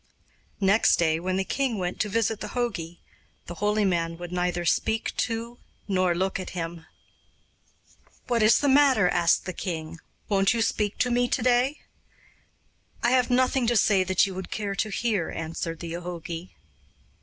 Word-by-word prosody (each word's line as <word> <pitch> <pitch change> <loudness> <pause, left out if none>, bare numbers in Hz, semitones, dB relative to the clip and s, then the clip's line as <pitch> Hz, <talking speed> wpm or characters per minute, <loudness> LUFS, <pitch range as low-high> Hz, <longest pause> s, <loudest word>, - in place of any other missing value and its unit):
Next 200 +2 +4
day, 160 -2 +1
when 185 +2 -2
the 190 - +1
king 260 +2 -1
went 180 -1 -3
to 215 - 0
visit 225 0 0
the - - -7
jogi, 175 -9 -3 0.5
the 175 - -7
holy 210 0 +2
man 170 -3 0
would 175 0 -8
neither 180 -1 -1
speak 220 +6 0
to 235 +1 -3 0.3
nor 185 -3 +1
look 190 +2 -1
at 185 -1 -7
him. 165 -1 -5 1.4
'What 240 -2 +1
is 215 +1 +6
the 290 - 0
matter?' 270 -9 +5
asked 170 -1 +2
the 185 - -4
king. 165 -2 -5 0.3
'Won't 195 +1 +2
you 230 - +2
speak 210 -2 -1
to 250 - +1
me 245 +1 +2
to - - -1
day?' 255 +4 +2 1.2
'I 240 - +3
have 255 -1 +3
nothing 255 0 +2
to 240 0 +3
say 195 -2 +4
that 185 +1 +3
you 195 - -5
would 185 -1 -6
care 205 -2 -3
to 215 +2 -1
hear,' 210 -5 -1
answered 165 0 -5
the 170 -1 -6
jogi. 175 0 -6
195 Hz, 170 wpm, -26 LUFS, 175-230 Hz, 1.4 s, is